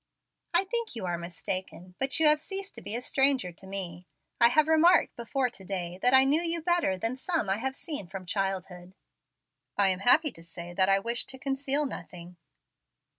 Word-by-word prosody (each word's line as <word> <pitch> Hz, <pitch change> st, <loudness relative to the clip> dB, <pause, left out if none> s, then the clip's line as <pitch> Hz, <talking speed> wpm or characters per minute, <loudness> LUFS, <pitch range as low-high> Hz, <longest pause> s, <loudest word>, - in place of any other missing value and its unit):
"I 345 Hz, +2 st, +3 dB
think 465 Hz, -, -3 dB
you 225 Hz, -, -5 dB
are 175 Hz, -1 st, -2 dB
mistaken. 180 Hz, +1 st, -5 dB
But 270 Hz, +4 st, +1 dB
you 320 Hz, -, +4 dB
have 300 Hz, 0 st, +6 dB
ceased 390 Hz, +4 st, -5 dB
to -, -, -9 dB
be 215 Hz, -, -3 dB
a 240 Hz, -, -3 dB
stranger 270 Hz, -8 st, +2 dB
to 190 Hz, +3 st, -14 dB
me. 180 Hz, -2 st, -6 dB, 0.3 s
I 235 Hz, -, +7 dB
have 310 Hz, +4 st, +3 dB
remarked 320 Hz, +3 st, +4 dB
before 250 Hz, +2 st, -1 dB
to 195 Hz, -, -11 dB
day, 180 Hz, -2 st, -4 dB
that 250 Hz, -, +4 dB
I 265 Hz, 0 st, +7 dB
knew 290 Hz, +5 st, +2 dB
you 335 Hz, 0 st, 0 dB
better 335 Hz, -, +1 dB
than 225 Hz, +6 st, -2 dB
some 265 Hz, -, -1 dB
I 195 Hz, -, +1 dB
have 265 Hz, +4 st, -3 dB
seen 285 Hz, -, -5 dB
from 190 Hz, 0 st, -8 dB
childhood." 185 Hz, -1 st, -3 dB, 0.8 s
"I 200 Hz, -1 st, +4 dB
am 185 Hz, -1 st, -1 dB
happy 290 Hz, +8 st, +5 dB
to 165 Hz, -, -13 dB
say 170 Hz, +1 st, -9 dB
that 190 Hz, +1 st, +2 dB
I 195 Hz, -, +5 dB
wish 235 Hz, +4 st, -3 dB
to 265 Hz, -, -7 dB
conceal 275 Hz, +2 st, -1 dB
nothing." 175 Hz, -8 st, -9 dB
235 Hz, 200 wpm, -28 LUFS, 185-290 Hz, 0.8 s, I